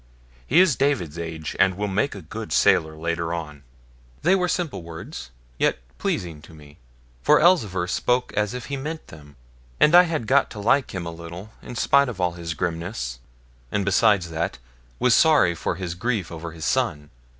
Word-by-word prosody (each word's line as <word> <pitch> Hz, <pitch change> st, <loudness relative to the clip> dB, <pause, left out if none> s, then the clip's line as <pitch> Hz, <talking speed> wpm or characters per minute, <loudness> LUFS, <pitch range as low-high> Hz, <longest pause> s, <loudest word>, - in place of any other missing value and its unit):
He -, -, +4 dB
is 180 Hz, -7 st, +5 dB
David's 100 Hz, -, 0 dB
age, 80 Hz, -2 st, -5 dB
and 95 Hz, -1 st, +3 dB
will 105 Hz, 0 st, -1 dB
make 105 Hz, +6 st, 0 dB
a 100 Hz, -, -9 dB
good 110 Hz, +7 st, -7 dB
sailor 80 Hz, -1 st, +3 dB
later 85 Hz, +1 st, -2 dB
on.' 75 Hz, -3 st, -7 dB, 0.6 s
They 180 Hz, -, +4 dB
were 180 Hz, -2 st, +2 dB
simple 175 Hz, -, -2 dB
words, 80 Hz, -6 st, -8 dB, 0.3 s
yet -, -, +2 dB, 0.2 s
pleasing 80 Hz, -4 st, -3 dB
to 80 Hz, +1 st, -15 dB
me; 75 Hz, -1 st, -16 dB, 0.4 s
for 150 Hz, -, +5 dB
Elzevir 110 Hz, -, +3 dB
spoke 125 Hz, +7 st, 0 dB
as 105 Hz, +2 st, 0 dB
if 125 Hz, -3 st, -6 dB
he 140 Hz, +2 st, -4 dB
meant 155 Hz, +4 st, -6 dB
them, 75 Hz, -2 st, -14 dB, 0.4 s
and 150 Hz, -, +5 dB
I 175 Hz, -, +10 dB
had 155 Hz, -8 st, -2 dB
got 135 Hz, +5 st, +3 dB
to 105 Hz, -, -9 dB
like 120 Hz, +3 st, +1 dB
him 90 Hz, -2 st, -4 dB
a 85 Hz, -, -4 dB
little 85 Hz, +5 st, -9 dB
in 125 Hz, -, -9 dB
spite 140 Hz, +2 st, +3 dB
of 110 Hz, -6 st, -7 dB
all 90 Hz, -1 st, +1 dB
his 85 Hz, -1 st, -6 dB
grimness; 85 Hz, -, -3 dB, 0.5 s
and 100 Hz, -2 st, 0 dB
beside 100 Hz, -1 st, +4 dB
that, 80 Hz, -1 st, -3 dB, 0.4 s
was 125 Hz, -, +3 dB
sorry 150 Hz, -, +5 dB
for 80 Hz, -, -3 dB
his 90 Hz, -3 st, -4 dB
grief 95 Hz, -1 st, -2 dB
over 85 Hz, 0 st, -6 dB
his 80 Hz, -1 st, -7 dB
son. 75 Hz, 0 st, -1 dB
95 Hz, 185 wpm, -24 LUFS, 80-125 Hz, 0.6 s, I